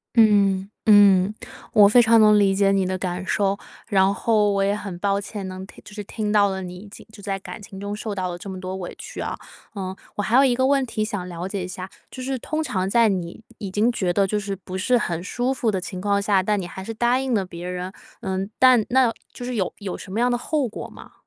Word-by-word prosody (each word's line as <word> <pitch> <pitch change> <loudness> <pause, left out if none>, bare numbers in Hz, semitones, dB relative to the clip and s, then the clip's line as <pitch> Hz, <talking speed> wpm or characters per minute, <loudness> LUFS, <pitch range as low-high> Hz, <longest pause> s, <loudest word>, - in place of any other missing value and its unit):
嗯， 200 -3 +4 0.2
嗯， 205 -1 +6 0.4
我 205 -1 +7
非 245 +4 +6
常 230 -1 +5
能 210 -1 +6
理 195 -1 +3
解 195 0 +3
你 195 -1 +2
的 185 0 -1
感 180 0 -3
受。 200 0 +1 0.3
然 195 -2 +3
后 215 -3 +2
我 195 0 +1
也 200 +1 +1
很 195 -4 -6
抱 200 +1 0
歉 200 -1 -6
能 185 0 -7
听 - - -16
就 - - -13
是 210 - -5
听 210 +1 -3
到 205 -1 +5
了 190 0 -4
你 180 0 -7
已 200 +3 -11
经 200 - -13
就 205 - -13
在 195 -1 -2
感 195 - -9
情 195 -1 -10
中 200 +1 -4
受 210 0 -4
到 185 -2 -2
了 175 - -6
这 195 - -9
么 190 -1 -6
多 185 0 -5
委 185 -2 -6
屈 - - -8
啊。 - - -3 0.4
呃， 190 -1 -4 0.2
我 205 - 0
还 225 +4 +2
有 275 - +7
一 255 -3 +3
个 260 +2 +2
问 275 -1 +3
题 215 -3 -2
想 205 -5 -4
了 175 +1 -5
解 195 -1 -3
一 - - -6
下， 185 +1 -7 0.2
就 255 - -8
是 265 0 -2
通 310 +5 -3
常 190 -10 -1
在 230 +2 +4
你 180 +1 -3 0.2
已 200 -4 -5
经 220 +5 +2
觉 185 -6 0
得 195 +2 +2
就 210 +2 -1
是 200 -1 -4
不 185 0 -8
是 245 +6 +2
很 170 -6 -2
舒 245 +7 -1
服 235 -4 0
的 190 -2 -1
情 185 +1 -6
况 200 +1 +1
下， 200 -2 +2
但 210 +1 0
你 180 - -5
还 190 +2 -8
是 225 +4 -5
答 240 +3 +2
应 265 -3 -1
了 200 - +1
别 175 0 -8
人， 180 +1 -4 0.3
呃， 190 -1 -2 0.2
但 255 -4 +6
那 255 -2 +4 0.2
就 245 - -8
是 250 0 -3
有 190 -6 -1
有 200 -3 -5
什 190 - -10
么 220 - -2
样 245 0 +2
的 240 - +1
后 290 +2 -1
果 215 - -7
吗？ - - -14
200 Hz, 280 characters per minute, -23 LUFS, 190-220 Hz, 0.4 s, 我